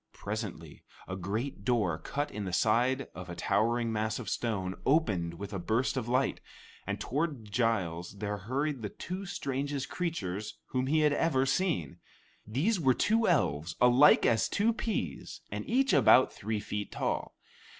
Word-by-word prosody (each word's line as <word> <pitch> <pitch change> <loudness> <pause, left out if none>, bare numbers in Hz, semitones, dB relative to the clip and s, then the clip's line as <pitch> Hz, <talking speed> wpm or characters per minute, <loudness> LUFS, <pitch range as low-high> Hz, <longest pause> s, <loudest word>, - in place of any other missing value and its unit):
Presently 100 -7 -6 0.2
a 90 - -4
great 100 +5 -3
door, 105 -10 +1
cut 145 - -3
in 105 -2 -4
the 90 - -4
side 125 +7 +2
of 90 +1 -8
a 90 - -5
towering 115 +6 +1
mass 110 0 -1
of - - -5
stone, 95 -6 -1
opened 100 - +1
with 100 +3 -7
a 100 - -2
burst 110 +11 0
of 125 -3 -2
light, 130 +2 +1 0.5
and 100 0 -2
toward 135 -3 -2
Giles 100 -6 -1
there 105 0 -3
hurried 135 +6 -2
the 105 - -3
two 185 - -6
strangest 140 -5 -3
creatures 105 - -3
whom 130 0 -1
he 155 +3 +3
had 150 -1 +4
ever 145 -4 +2
seen. 135 - 0 0.5
These 165 - +1
were 130 -5 +3
two 225 +1 +2
elves, 80 - +1
alike 125 +4 +6
as 115 -2 +3
two 225 +3 +2
peas 225 -1 -4
and - - -5
each 270 +2 +3
about 130 - +6
three 110 +1 -3
feet 105 -1 -4
tall. - - -2
115 Hz, 160 wpm, -30 LUFS, 100-145 Hz, 0.5 s, alike